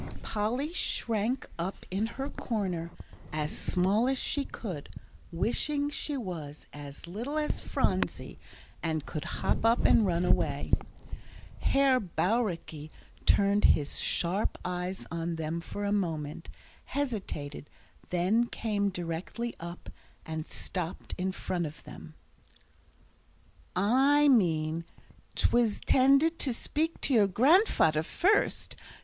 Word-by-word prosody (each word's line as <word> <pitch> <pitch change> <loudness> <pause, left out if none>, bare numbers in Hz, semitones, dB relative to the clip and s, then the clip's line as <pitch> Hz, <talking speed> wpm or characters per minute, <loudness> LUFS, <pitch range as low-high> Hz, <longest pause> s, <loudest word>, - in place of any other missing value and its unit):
Polly 245 +9 -1
shrank 230 - 0
up 180 +3 -4
in 200 +4 0
her 270 +1 -2
corner 190 - -2 0.4
as 150 0 -2
small 200 +7 +2
as 270 - +1
she 285 +2 0
could, 180 - -6 0.4
wishing 285 - 0
she 290 0 -2
was 165 - -6
as 145 +1 -9
little 235 - -4
as 300 -1 0
Phronsie, - - -1 0.4
and 160 -3 -1
could 155 - -4
hop - - -1
up 230 +1 +4
and 225 - +6
run 175 0 +1
away. 145 -5 +1 0.9
Herr 275 -2 +4
Bauricke 175 -5 -1 0.4
turned 200 0 +4
his 145 -1 -3
sharp 185 +5 0
eyes 180 +1 -3
on 170 0 -2
them 160 +1 -3
for 205 +4 -5
a 200 - 0
moment, 165 -6 -2 0.4
hesitated, 195 - -4 0.4
then 190 +7 +2
came 205 -4 -1
directly 180 +7 -4
up, 170 +1 -8 0.3
and 160 0 -4
stopped 180 -2 -5
in 190 +1 0
front 175 -2 -2
of 150 - -11
them. - - -11 1.6
"I 270 +9 +4
meant 165 - +2 0.5
I - - -3
_in_tended 270 +7 +4
to 260 - +1
speak 315 +7 -2
to 275 - 0
your 215 -4 +6
grandfader 220 - +4
first. 400 - +1
195 Hz, 120 wpm, -30 LUFS, 165-245 Hz, 1.6 s, and